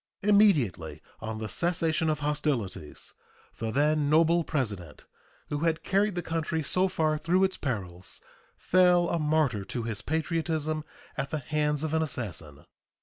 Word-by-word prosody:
Immediately 140 - +3 0.2
on 110 0 -5
the 110 0 -4
cessation 165 +1 +1
of 155 -1 -1
hostilities 140 - -2 0.5
the 115 - -2
then 145 +3 +2
noble 165 +2 +4
President, 105 - -4 0.4
who 145 - -2
had 165 0 0
carried 200 0 +1
the 175 - -2
country 160 -1 -2
so 185 +5 +2
far 155 -4 0
through 180 +4 +2
its 190 0 +1
perils, 95 - -4 0.4
fell 180 -1 +4
a 170 - 0
martyr 150 -9 +1
to 120 +2 -4
his 110 -3 -3
patriotism 155 0 -1 0.3
at 140 0 -2
the 155 - -2
hands 150 +1 -1
of 160 -1 -2
an 160 - +2
assassin. 90 - -5
155 Hz, 145 wpm, -28 LUFS, 115-165 Hz, 0.5 s, noble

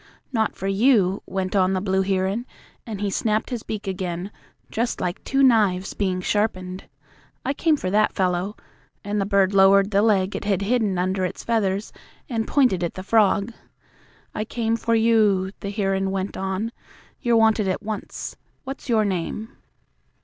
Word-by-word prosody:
"Not 220 -2 0
for - - -6
you," 195 -2 +3
went 190 0 -2
on 190 -1 +3
the 190 - +1
blue 190 0 +1
heron, 195 +5 -1 0.4
and 210 -3 -5
he 205 -1 0
snapped 215 +4 0
his 240 -3 -3
beak 215 -1 -5
again, 185 0 -3 0.4
just 235 +2 -1
like 175 0 -3
two 275 0 +1
knives 205 -7 +3
being 185 -3 -1
sharpened. 185 -2 -1 0.6
"I 275 - +1
came 310 +1 +2
for 185 -8 -3
that 215 +1 +3
fellow," 185 +2 0 0.5
and 205 0 -1
the 195 - -1
bird 200 -1 +3
lowered 195 +1 +5
the 200 0 +3
leg 200 -3 +2
it - - -4
had 200 -1 +1
hidden 215 -3 +1
under 185 +1 0
its 180 - -4
feathers 205 -3 0 0.3
and 225 -5 -2
pointed 250 - +2
at 170 - -2
the 185 - -6
frog. 215 +1 +2 0.8
"I 215 - -2
came 225 0 -1
for 230 0 0
you," 215 -4 +3
the 200 - -5
heron 195 -2 0
went 190 0 -3
on. 190 +4 -2 0.5
"You're 235 -1 +3
wanted 220 -2 +3
at 185 +3 -2
once. 215 -1 -5 0.3
What's 270 0 -7
your 220 -2 +3
name?" 200 +3 -3
200 Hz, 170 wpm, -23 LUFS, 190-220 Hz, 0.8 s, lowered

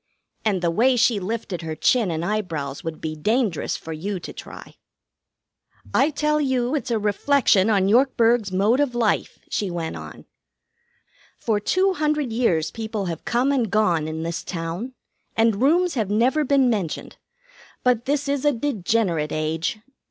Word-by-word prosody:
And 195 -5 0
the 170 - +2
way 250 +8 +3
she 230 -2 +3
lifted 195 -2 -4
her 160 -1 -4
chin 230 +3 +2
and 165 0 -2
eyebrows 165 -9 -3
would 165 -1 -6
be 155 -1 -3
dangerous 210 - 0
for 160 - -7
you 190 +5 -4
to - - -8
try. - - -11 1.2
"'I 280 - +4
tell 300 0 0
you 260 -2 0
it's 295 - -2
a 230 - +1
reflection 210 0 +2
on 195 -3 +3
Yorkburg's 235 -2 +3
mode 205 +7 +2
of 280 -4 0
life,' 230 -3 0
she 205 - -1
went 170 -2 -4
on. - - -10 1.1
'For 220 -3 0
two 375 - +2
hundred 300 -6 -1
years 175 -10 +1
people 220 -2 -4
have 170 -2 -5
come 245 +4 +1
and 250 -6 +1
gone 180 -7 +2
in 160 +1 -4
this 170 0 -3
town, 175 +9 -5 0.4
and 225 -1 +2
rooms 340 +6 +3
have 220 -7 -1
never 250 +9 +2
been 275 -2 +3
mentioned. 200 -9 -2 0.7
But 245 -2 +2
this 285 +1 0
is 280 -1 -1
a 295 - +4
degenerate 215 - 0
age. 155 +5 -1
220 Hz, 160 wpm, -23 LUFS, 175-260 Hz, 1.2 s, I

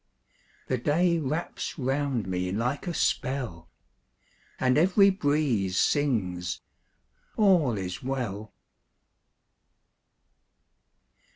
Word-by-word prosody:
The 130 - -1
day 170 +6 +2
wraps 155 +5 -3
round 135 -3 -1
me 90 0 -2
like 125 - -2
a 175 - -2
spell, 115 - -1 0.9
And 130 -1 +3
every 190 +5 +5
breeze 145 - 0
sings, 90 - 0 0.8
"All 175 - +4
is 90 -2 -5
well." 115 -6 -4
130 Hz, 80 wpm, -27 LUFS, 100-150 Hz, 0.9 s, every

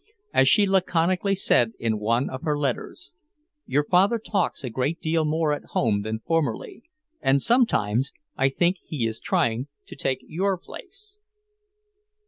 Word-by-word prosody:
As 135 - +4
she 205 +8 +6
laconically 185 0 +1
said 120 -11 +2
in 110 -2 -1
one 115 +5 +1
of 130 - -6
her 150 -3 0
letters: 145 - -4 0.5
"Your 145 +2 +2
father 190 +9 +3
talks 200 -8 -2
a 125 - -4
great 130 +8 -1
deal 160 0 0
more 155 0 +1
at 145 - -4
home 105 -5 +2
than 110 +1 -4
formerly, 165 - -1 0.4
and 135 +1 +3
sometimes 135 - +2 0.2
I 135 +1 +2
think 175 +7 +1
he 140 -7 -3
is 115 0 -2
trying 120 +3 0 0.2
to - - -11
take 135 -1 -2
your 190 +4 -1
place." 405 - -12
150 Hz, 150 wpm, -24 LUFS, 125-185 Hz, 0.5 s, she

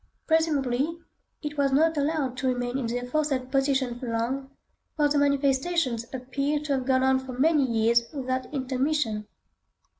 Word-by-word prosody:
Presumably, 310 -2 +1 0.5
it 295 -1 -4
was 275 -1 +3
not 320 +4 +3
allowed 285 -3 0
to 260 - -1
remain 245 -1 -1
in 245 - -2
the 235 +2 -1
aforesaid 260 0 -1
position 270 -3 +1
long, 250 +3 -2 0.5
for 295 -2 +3
the 290 0 +2
manifestations 280 -2 +1
appear 275 +3 -2
to 300 -2 -1
have 260 -1 -2
gone 260 -1 +3
on 265 0 +3
for 260 -1 -8
many 290 +2 +3
years 230 +1 +3
without 260 -3 -3
intermission. 260 -5 -1
265 Hz, 150 wpm, -26 LUFS, 250-295 Hz, 0.5 s, was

